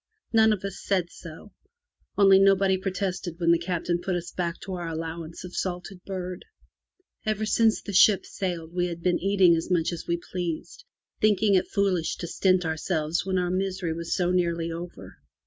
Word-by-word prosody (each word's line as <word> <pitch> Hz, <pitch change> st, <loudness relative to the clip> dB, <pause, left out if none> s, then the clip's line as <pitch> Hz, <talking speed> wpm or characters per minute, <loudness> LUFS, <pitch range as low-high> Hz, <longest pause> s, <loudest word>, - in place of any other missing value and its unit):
None 220 Hz, -1 st, +6 dB
of 205 Hz, -3 st, -1 dB
us 195 Hz, -1 st, -5 dB
said 185 Hz, -4 st, 0 dB
so, 165 Hz, +5 st, -11 dB, 0.7 s
only 195 Hz, -1 st, +7 dB
nobody 195 Hz, -1 st, +4 dB
protested 190 Hz, -2 st, -3 dB
when 170 Hz, -1 st, +3 dB
the 170 Hz, -, +4 dB
Captain 175 Hz, 0 st, -1 dB
put 185 Hz, 0 st, -1 dB
us 175 Hz, 0 st, -4 dB
back 170 Hz, -1 st, -3 dB
to 190 Hz, -, -6 dB
our 175 Hz, -2 st, -4 dB
allowance 165 Hz, +1 st, -5 dB
of 180 Hz, 0 st, -9 dB
salted 180 Hz, 0 st, -4 dB
bird. 185 Hz, -2 st, -5 dB, 0.8 s
Ever 215 Hz, -1 st, -1 dB
since 220 Hz, 0 st, +2 dB
the 200 Hz, -, -5 dB
boat 205 Hz, -3 st, -1 dB
sailed 175 Hz, -4 st, -4 dB
we 180 Hz, 0 st, 0 dB
had 170 Hz, -1 st, -7 dB
been 180 Hz, -1 st, +2 dB
eating 190 Hz, -3 st, +4 dB
as 165 Hz, -, -3 dB
much 175 Hz, -2 st, +1 dB
as 170 Hz, -, -7 dB
we 170 Hz, -, +1 dB
pleased, 180 Hz, -, -4 dB, 0.3 s
thinking 210 Hz, -1 st, +3 dB
it 185 Hz, -, +3 dB
foolish 190 Hz, -5 st, 0 dB
to -, -, -6 dB
stint 185 Hz, +1 st, +2 dB
ourselves 160 Hz, +1 st, -1 dB
when 190 Hz, -1 st, 0 dB
our 180 Hz, -1 st, 0 dB
misery 185 Hz, -2 st, -1 dB
was 170 Hz, 0 st, -3 dB
so 180 Hz, -1 st, +1 dB
nearly 170 Hz, -2 st, 0 dB
over. 170 Hz, +1 st, -8 dB
180 Hz, 180 wpm, -26 LUFS, 170-195 Hz, 0.8 s, only